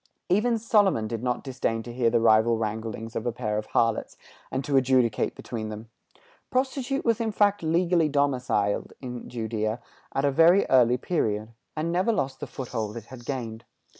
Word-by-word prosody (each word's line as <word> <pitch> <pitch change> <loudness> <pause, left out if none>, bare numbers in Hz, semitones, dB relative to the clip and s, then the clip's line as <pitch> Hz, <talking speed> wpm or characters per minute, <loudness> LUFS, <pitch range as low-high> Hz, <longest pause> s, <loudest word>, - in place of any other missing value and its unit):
Even 220 +6 +3
Solomon 205 - +2
did 115 0 -4
not 125 -1 -1
disdain 125 -4 -2
to 120 - -8
hear 120 -1 +2
the 120 0 +2
rival 115 0 +4
wranglings 110 +1 -4
of 115 - -2
a - - +1
pair 110 -3 -2
of 110 - -7
harlots, 115 -1 0 0.3
and 130 +1 -3
to 145 - 0
adjudicate 130 -4 +2
between 110 -3 -5
them. 110 +2 -8 0.6
Prostitution 265 +1 -1
was 230 -1 +2
in 225 -1 0
fact 205 -1 +2
legally 170 0 +2
domiciled 125 -8 0
in 125 -2 -7
Judæa 110 -1 -2 0.4
at 135 - +1
a 140 - +3
very 165 +7 +5
early 125 -1 +5
period, 110 -8 -1 0.3
and 160 +2 -1
never 185 +6 +2
lost 135 -11 -2
the - - -5
foothold 115 -4 -4
it 115 - -8
had 120 -2 -10
gained. 115 -5 -4
125 Hz, 175 wpm, -26 LUFS, 115-165 Hz, 0.6 s, very